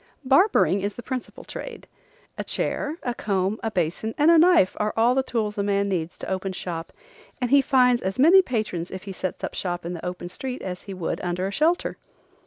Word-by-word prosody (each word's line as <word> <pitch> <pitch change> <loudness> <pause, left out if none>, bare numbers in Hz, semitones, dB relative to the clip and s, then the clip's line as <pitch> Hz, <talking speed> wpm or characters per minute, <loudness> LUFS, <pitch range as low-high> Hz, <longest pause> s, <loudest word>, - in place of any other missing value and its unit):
Barbering 270 - +4
is 200 +1 -3
the 240 - -8
principal 255 +1 -6
trade. - - -8 0.5
A - - -4
chair, 300 +2 -2
a 245 - -1
comb, 200 -2 -1
a 225 - -1
basin 185 +3 -2
and 300 +3 +5
a 335 - +7
knife 340 - +5
are 210 0 -1
all 235 +2 +4
the 265 - +2
tools 220 -5 -2
a - - +3
man 200 0 +1
needs 170 -3 -2
to - - -7
open 190 0 -2
shop, 170 -2 -5 0.5
and 245 -2 -1
he 280 0 +7
finds 250 -2 +3
as 190 +3 -3
many 335 +8 +7
patrons 215 - -3
if 190 -1 -7
he 200 - -7
sets 185 -1 -5
up - - -3
shop 175 -2 -3
in 175 - -3
the 170 - -7
open 180 0 -5
street 255 +8 -6
as 180 -1 -5
he 195 - -6
would 180 -3 -3
under 180 +2 -2
shelter. 320 - +1
210 Hz, 210 wpm, -24 LUFS, 185-260 Hz, 0.5 s, a